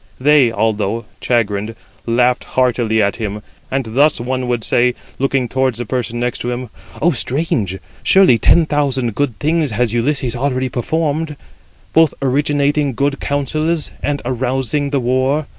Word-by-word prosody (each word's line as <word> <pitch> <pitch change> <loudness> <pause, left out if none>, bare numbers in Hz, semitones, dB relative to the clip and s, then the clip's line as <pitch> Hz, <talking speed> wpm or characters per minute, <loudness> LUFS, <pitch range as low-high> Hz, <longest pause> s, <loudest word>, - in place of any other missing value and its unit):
They, 140 -3 +4
although 110 0 -1 0.2
chagrined, 110 -2 0 0.3
laughed 125 +1 +2
heartily 120 -4 +2
at 100 - 0
him, 105 -2 -4 0.3
and 135 -1 -1
thus 145 +4 +3
one 130 +1 -2
would 120 -2 -1
say, 125 +2 +2 0.2
looking 135 -1 +1
towards 130 -1 0
the 120 - -4
person 120 0 -3
next 120 0 -2
him: 120 -1 -4 0.3
"O 175 - +5
strange! 125 - -1 0.2
surely 190 -12 +5
ten 170 - +5
thousand 135 -6 0
good 135 -2 -1
deeds 155 0 +1
has 115 0 0
Ulysses 125 0 0
already 130 0 -1
performed, 150 +4 -2 0.6
both 160 -3 +4
originating 145 +1 +1
good 140 +1 0
counsels, 155 +3 -1
and 145 0 -2
arousing 130 +3 -1
the 140 -1 0
war. 130 +4 +1
130 Hz, 140 wpm, -17 LUFS, 120-145 Hz, 0.6 s, O